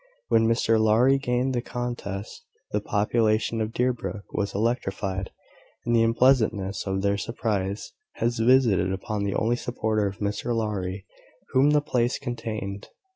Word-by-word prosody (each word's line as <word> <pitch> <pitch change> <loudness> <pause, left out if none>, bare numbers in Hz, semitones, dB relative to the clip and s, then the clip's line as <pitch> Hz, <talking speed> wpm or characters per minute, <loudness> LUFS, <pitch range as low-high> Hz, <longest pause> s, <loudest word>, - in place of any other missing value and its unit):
When 115 -1 +4
Mr 115 -1 +2
Lowry 120 +5 +4
gained 125 0 0
the 120 - 0
contest, 120 -5 -5 0.3
the 105 - 0
population 110 +2 +1
of 110 0 -2
Deerbrook 120 -4 -2
was 100 -1 -2
electrified, 95 -4 -1 0.6
and 120 0 +2
the 115 - +5
unpleasantness 115 -5 +2
of 95 0 -1
their 100 0 +1
surprise 100 -4 -2 0.3
was 120 0 0
visited 115 -6 +4
upon 100 +2 -3
the 100 - -1
only 120 +2 +1
supporter 110 -4 -1
of 100 0 -6
Mr 105 +3 -2
Lowry 100 -4 -2 0.5
whom 135 +3 +5
the 150 0 +4
place 125 -3 0
contained. 110 -6 -5
110 Hz, 140 wpm, -26 LUFS, 100-120 Hz, 0.6 s, the